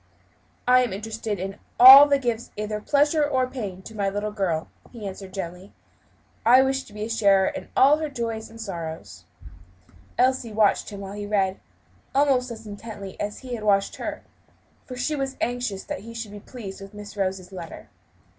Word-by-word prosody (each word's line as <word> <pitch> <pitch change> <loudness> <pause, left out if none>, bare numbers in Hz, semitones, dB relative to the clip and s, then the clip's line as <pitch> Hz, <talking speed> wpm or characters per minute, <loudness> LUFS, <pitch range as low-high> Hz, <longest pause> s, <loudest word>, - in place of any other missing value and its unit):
"I 255 0 +6
am 245 -5 -1
interested 215 0 -4
in 195 +2 -5 0.2
all 270 +3 +12
that 280 -2 +1
gives 235 -1 -2
either 210 0 -3
pleasure 295 +4 +2
or 265 -3 +1
pain 210 -8 -6
to 220 - -10
my 200 -2 0
little 205 +2 -3
girl," 180 -6 -1 0.2
he 230 -4 -9
answered 190 0 -8
gently. 185 0 -7 0.7
"I 250 +3 +7
wish 270 0 -1
to 210 - -16
be 210 0 -5
a - - -3
sharer 200 -4 +3
in - - -8
all 280 +3 +6
her 310 -1 -3
joys 230 -4 -4
and 225 - -13
sorrows." 170 -7 -7 0.9
Elsie 255 -2 +2
watched 210 -1 +2
him 200 -1 -8
while 195 0 -7
he 205 0 -6
read, 195 -2 0 0.6
almost 270 -3 +3
as 225 -1 -9
intently 205 -2 -8
as 205 0 -3
he 255 -2 -7
had 225 -3 -5
watched 200 -2 +2
her; - - -5 0.6
for 255 - -7
she 255 +5 -1
was 270 -1 -3
anxious 245 -5 -2
that - - -5
he 230 +3 -11
should 225 -3 -6
be 205 - -9
pleased 200 -4 -9
with 195 +1 -11
Miss 210 0 -9
Rose's 190 -2 -3
letter. 175 -3 -9
215 Hz, 185 wpm, -24 LUFS, 195-250 Hz, 0.9 s, all